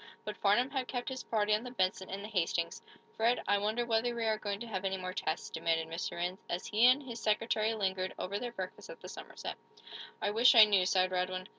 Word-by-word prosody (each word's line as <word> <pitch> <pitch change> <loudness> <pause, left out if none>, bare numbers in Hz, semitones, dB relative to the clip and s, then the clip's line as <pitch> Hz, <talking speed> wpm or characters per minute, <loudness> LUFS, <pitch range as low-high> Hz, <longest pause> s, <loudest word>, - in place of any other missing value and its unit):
But 210 - -4
Farnum 225 +6 +2
had 265 -3 -2
kept 245 0 -3
his 260 -1 -5
party 215 -1 +1
on 215 +2 +1
the 250 - -6
"Benson" 190 -5 -1
and 195 +1 -5
the - - -5
"Hastings." 170 -4 -1 0.3
"Fred, 230 +2 +2
I 205 +1 +3
wonder 215 +4 0
whether 235 +1 +1
we 230 -1 -2
are 220 -1 +1
going 200 -1 -3
to - - -4
have 195 -4 -4
any 190 0 -1
more 185 0 -5
tests," - - -3
demanded 165 -1 0
Mr. 165 +2 -4
Rhinds, 180 +2 -3
as 175 - -3
he 220 +3 +4
and 260 +3 +4
his 235 -3 -7
secretary 220 0 +1
lingered 190 -2 -2
over 200 +2 -3
their 245 -1 -4
breakfast 190 - -7
at - - -9
the - - -10
Somerset. - - -7 0.6
"I 205 - 0
wish 235 +4 +6
I 220 -2 +11
knew," 195 -3 +3
sighed 185 0 +2
Radwin. 185 0 -1
210 Hz, 235 wpm, -32 LUFS, 185-235 Hz, 0.6 s, I